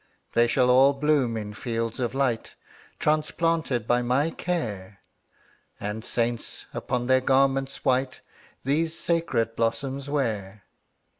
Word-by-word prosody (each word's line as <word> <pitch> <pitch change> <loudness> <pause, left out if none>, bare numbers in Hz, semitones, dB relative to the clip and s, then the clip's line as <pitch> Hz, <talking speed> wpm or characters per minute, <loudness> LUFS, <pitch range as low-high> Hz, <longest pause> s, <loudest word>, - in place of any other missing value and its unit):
``They 120 0 +4
shall 125 0 +3
all 135 +2 +6
bloom 140 -5 +1
in 105 -1 -5
fields 115 0 -3
of 120 0 -2
light, 130 -5 -1 0.4
Transplanted 155 -4 0
by 120 0 +3
my 130 +6 +1
care, 105 - -4 0.8
And 105 +2 -4
saints, 120 -1 -2
upon 125 -1 -2
their 130 +1 +4
garments 135 +1 +1
white, 130 0 +1 0.4
These 160 +4 0
sacred 135 -10 0
blossoms 135 +5 -1
wear.'' 105 -8 -2
130 Hz, 120 wpm, -26 LUFS, 115-140 Hz, 0.8 s, all